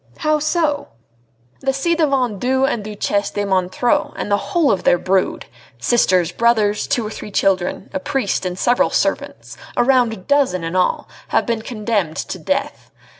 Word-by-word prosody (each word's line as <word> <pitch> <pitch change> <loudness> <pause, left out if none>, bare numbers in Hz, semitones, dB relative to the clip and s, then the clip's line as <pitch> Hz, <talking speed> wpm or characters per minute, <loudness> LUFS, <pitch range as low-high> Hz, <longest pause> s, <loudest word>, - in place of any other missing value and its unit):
"How 305 -1 +1
so?" 305 -1 0 0.7
"The 270 0 0
ci 305 +6 0
devant 270 - +1
Duc 260 +3 +2
and 225 -5 -2
Duchesse 205 -1 -1
de 205 - -2
Montreux 190 +5 0
and 205 - -4
the 205 - +4
whole 335 -5 +3
of 195 - -1
their 175 - +4
brood 185 +2 0 0.3
sisters, 185 -8 +2
brothers, 215 0 +1
two 235 - 0
or 210 - -5
three 210 - -8
children, 190 -1 0
a 285 - -1
priest, 270 -10 -1
and 180 -1 -3
several 245 +5 +2
servants - - -2 0.2
a - - +4
round 240 -6 +2
dozen 275 -11 +2
in 165 +2 -4
all, 185 -1 +1 0.2
have - - +1
been 230 -2 -1
condemned 215 -8 -2
to - - -4
death. - - -3
220 Hz, 170 wpm, -19 LUFS, 190-270 Hz, 0.7 s, the